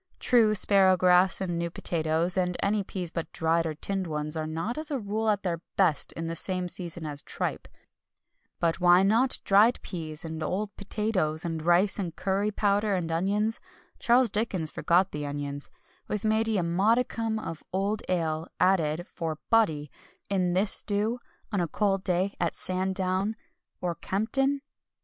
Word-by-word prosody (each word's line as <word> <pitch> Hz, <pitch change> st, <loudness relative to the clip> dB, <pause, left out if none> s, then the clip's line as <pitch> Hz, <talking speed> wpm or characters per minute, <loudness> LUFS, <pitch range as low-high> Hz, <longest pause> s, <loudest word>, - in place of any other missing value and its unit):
True, 225 Hz, -4 st, +4 dB
sparrowgrass 185 Hz, -2 st, +5 dB
and 175 Hz, -3 st, -2 dB
new 170 Hz, 0 st, -1 dB
potatoes, 165 Hz, +1 st, -1 dB
and 180 Hz, -1 st, 0 dB
any 205 Hz, +1 st, +1 dB
peas 180 Hz, -3 st, -5 dB
but 165 Hz, -2 st, -5 dB
dried 165 Hz, +1 st, +1 dB
or 155 Hz, -, -4 dB
tinned 190 Hz, +3 st, -3 dB
ones 150 Hz, 0 st, -1 dB
are 155 Hz, -1 st, -2 dB
not 165 Hz, +9 st, -3 dB
as 310 Hz, -, -1 dB
a 285 Hz, -, -1 dB
rule 215 Hz, 0 st, -2 dB
at 205 Hz, -2 st, +1 dB
their 170 Hz, -3 st, -2 dB
best 180 Hz, -6 st, +2 dB
in 165 Hz, -, -5 dB
the 165 Hz, 0 st, -3 dB
same 185 Hz, +1 st, -2 dB
season 175 Hz, -2 st, -4 dB
as 145 Hz, -1 st, -4 dB
tripe; -, -, -3 dB, 0.9 s
but 165 Hz, +1 st, 0 dB
why 175 Hz, +1 st, +6 dB
not 230 Hz, +6 st, +3 dB
dried 210 Hz, +5 st, +4 dB
peas, 160 Hz, -3 st, -4 dB
and 160 Hz, 0 st, -5 dB
old 200 Hz, +6 st, -3 dB
potatoes, 195 Hz, -7 st, -2 dB
and 165 Hz, -2 st, -3 dB
rice, 175 Hz, +5 st, +3 dB
and 175 Hz, -5 st, -3 dB
curry 195 Hz, +2 st, 0 dB
powder, 205 Hz, 0 st, +1 dB
and 170 Hz, -3 st, -2 dB
onions 205 Hz, +6 st, 0 dB, 0.4 s
Charles 240 Hz, -1 st, +3 dB
Dickens 195 Hz, -8 st, 0 dB
forgot 180 Hz, +3 st, +2 dB
the 150 Hz, 0 st, -4 dB
onions 145 Hz, 0 st, -4 dB, 0.4 s
with, 210 Hz, 0 st, -3 dB
maybe, 220 Hz, 0 st, +2 dB
a 180 Hz, -, +1 dB
modicum 220 Hz, +5 st, +1 dB
of 165 Hz, -7 st, -6 dB
old 200 Hz, +3 st, -1 dB
ale 160 Hz, -3 st, -1 dB
added, 175 Hz, -2 st, +2 dB
for 160 Hz, -2 st, -4 dB
"body" 155 Hz, -11 st, +2 dB, 0.4 s
in 180 Hz, -3 st, +1 dB
this 195 Hz, +3 st, +2 dB
stew, 215 Hz, +4 st, +1 dB, 0.3 s
on 200 Hz, -4 st, 0 dB
a 170 Hz, -, 0 dB
cold 195 Hz, +2 st, 0 dB
day 185 Hz, +2 st, 0 dB
at 170 Hz, -1 st, -1 dB
Sandown 190 Hz, +2 st, -1 dB, 0.5 s
or 175 Hz, -1 st, -1 dB
Kempton? 230 Hz, +11 st, 0 dB
185 Hz, 165 wpm, -27 LUFS, 165-210 Hz, 0.9 s, why